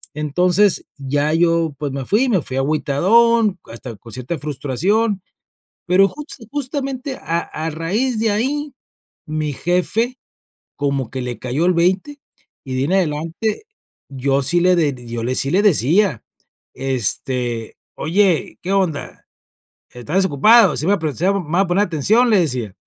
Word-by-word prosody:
Entonces 180 +6 +2
ya 145 +2 -1
yo, 165 -2 +2
pues, 145 -2 -3
me 135 -1 -4
fui 240 +6 +2
me 195 -7 +2
fui 130 -2 -6
agüitadón 185 +10 +2
hasta 115 0 -9
con 115 +1 -14
cierta 130 +6 -4
frustración, 185 - -1 0.7
pero 190 +2 +5
justa 295 -5 -9
justamente, 275 -1 -4
a 165 +2 -2
a 160 -1 -5
raíz 210 - -1
de 225 -1 +2
ahí, 280 +7 -2 0.5
mi 155 -1 -2
jefe 210 - 0 0.6
como 140 -4 -2
que 130 -1 -4
le 125 -1 -4
cayó 135 +7 -1
el 180 - +3
20. 190 +12 0 0.5
Y 130 - -7
de - - -1
ahi - - +1
en 180 - -2
adelante, 170 - -1 0.5
yo 135 0 0
sí 175 +5 +2
le 170 -5 +3
yo 115 0 -4
le 130 +1 -1
sí 135 - +2
le 200 +3 +3
decía: 170 - +2 0.5
"Este, 125 -2 -1 0.2
oye, 180 +1 +1
¿qué 185 +2 -2
onda?, 180 -7 -1 0.7
¿está 125 +7 -6
desocupado?, 195 - +5
sí, 155 - -1
me - - +3
va - - +5
a - - -13
prestar, 160 +5 0
me 180 -6 -4
va 185 - +3
a 195 - +1
poner 195 +4 +2
atención", 215 - +2
le 210 - +4
decía: 125 - -2
170 Hz, 155 wpm, -19 LUFS, 140-205 Hz, 0.7 s, pero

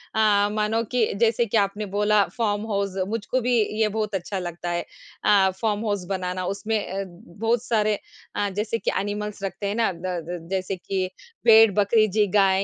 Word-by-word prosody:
अ, 205 -2 +4
मानो 215 +2 0
कि 245 -3 +3
जैसे 230 +1 +3
कि 225 0 0
आपने 205 +1 0
बोला 210 0 +4
फ़ार्म 210 -2 0
हाउस 200 -1 -1
मुझको 225 +3 -1
भी 245 +1 +1 0.3
ये 220 - +4
बहुत 210 -1 -2
अच्छा 190 +1 -3
लगता 175 -1 -5
है। 175 0 -1 0.4
अ, 195 -2 +5
फ़ार्म 215 0 0
हाउस 205 -3 -1
बनाना 185 -1 -2
उसमें 205 +4 -1
अ, 195 +1 -3
बहुत 220 +6 -3
सारे 215 -3 +1 0.4
अ, 205 -1 0
जैसे 210 +4 -2
कि - - 0
एनिमल्स 205 0 -4
रखते 195 +1 -3
हैं 200 - -2
ना, 230 -2 +2
द 170 0 -9
अ, 175 -1 -3
जैसे 190 0 -1
कि 185 0 -2 0.4
भेड़, 225 -2 +8
बकरी 215 +2 +4
जी, 210 +1 +2
गाय, 195 -1 +4
205 Hz, 185 wpm, -24 LUFS, 190-220 Hz, 0.4 s, भेड़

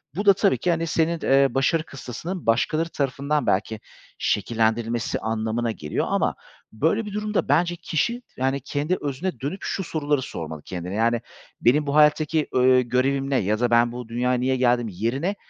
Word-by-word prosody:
Bu 205 +4 -2
da 200 - +8
tabii 200 0 +2
ki, 180 - 0
hani, 165 0 -1
senin, 165 +1 +1
eee, 135 +1 +5
başarı 135 +5 +1
kıstasının 160 - -7
başkaları 155 +8 +1
tarafından 140 +1 -1
belki 110 +3 0 0.4
şekillendirilmesi 115 +2 0
anlamına 110 +1 -1
geliyor 75 -8 -3
ama - - +1 0.4
böyle 165 - 0
bir 205 - -7
durumda 210 0 -1
bence 175 +1 +2
kişi, 235 +9 -1 0.2
yani, 135 +2 0
kendi 145 +6 -1
özüne 145 +1 -3
dönüp 145 - -4
şu 190 - -3
soruları 150 -4 -1
sormalı 80 - -6
kendine. 90 +1 -5
Yani, 115 +2 +1 0.4
"Benim 145 +5 +3
bu 140 - -1
hayattaki, 150 0 +3
ııı, 130 0 +5
görevim 135 +3 0
ne 135 - +2
ya 105 +2 0
da 120 0 +2
ben 120 0 +4
bu 120 -1 -7
dünyaya 125 +2 0
niye 130 +1 +1
geldim?" 120 -2 +2
yerine 120 - -2
135 Hz, 170 wpm, -24 LUFS, 115-160 Hz, 0.4 s, da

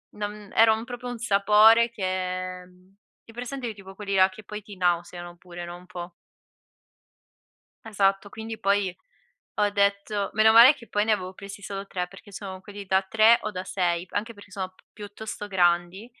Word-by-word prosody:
non 210 -1 -6
era 225 0 +6
un 220 +1 -3
proprio 245 0 -7
un 245 - -5
sapore 215 +2 +5
che 230 -4 -8 1.2
hai 225 - -15
presente 245 0 -5
tipo 195 -2 -13
quelli 200 -1 -3
là 190 0 +5
che 195 +3 -13
poi 210 +1 -7
ti 205 0 -12
nauseano 175 0 -1
pure, 175 -1 -9
no, 175 0 -8
un 180 - -16
po'. 175 0 -8 1.7
Esatto. 195 -2 +1
Quindi, 220 +1 -7
poi 195 -2 +1 0.6
ho 205 -1 +2
detto: 200 0 0
"Meno 215 +1 +5
male 235 +6 +9
che 235 -5 -15
poi 205 +1 +1
ne 220 - +2
avevo 185 -3 -2
presi 200 +1 -10
solo 195 0 -6
3." 180 -2 -3
perché 195 +2 -15
sono 190 -1 -7
quelli 205 +1 -9
da 190 +1 +2
3 220 +4 +5
o 215 - -3
da 185 -2 -6
6, 175 -2 -1
anche 220 +3 -3
perché 205 0 -16
sono 190 -1 -5
p 185 - -27
piuttosto 210 0 -8
grandi, 175 +2 +1
200 Hz, 180 wpm, -26 LUFS, 190-220 Hz, 1.7 s, male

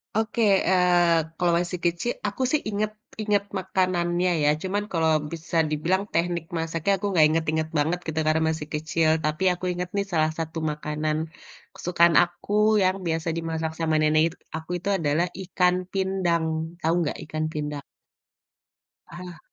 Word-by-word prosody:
Oke, 220 +2 0 0.3
eee, 175 -2 +4 0.2
kalau 175 -1 +2
masih 180 0 -3
kecil 175 +8 0 0.2
aku 205 +5 -5
sih 305 - +2
inget 210 +1 -1 0.3
inget 205 -1 +1 0.2
makanannya 180 -1 0 0.2
ya - - +5
cuman 200 +2 -1
kalau 160 -2 +2 0.2
bisa 165 +1 -4
dibilang 170 +6 0
teknik 170 0 0 0.2
masaknya 165 +3 -1
aku - - -2
gak 155 - +7
inget-inget 160 0 0
banget 160 +4 +1
gitu 160 0 -2
karena 155 +1 +2
masih 150 -1 -6
kecil, 155 +1 +1
tapi 155 +4 -1
aku 180 - -6
inget 180 0 -4
nih 200 - +1
salah 155 -1 +3
satu 165 0 -4
makanan 150 +1 -2 0.6
kesukaan 170 -1 +3
aku 175 +3 -3 0.3
yang 185 0 +2
biasa 165 0 -1
dimasak 160 -1 -2
sama 160 -1 +1
nenek 155 0 +3
it 165 - -6 0.2
aku 160 +1 -7
itu 180 +3 -4
adalah 155 0 +1 0.2
ikan 180 0 +2 0.2
pindang, 190 -4 0 0.4
tahu 165 +1 +2
nggak 155 - -2
ikan 155 0 -3
pindang? 150 -1 -4 1.3
Aha. 175 0 -9
170 Hz, 155 wpm, -25 LUFS, 160-180 Hz, 1.3 s, gak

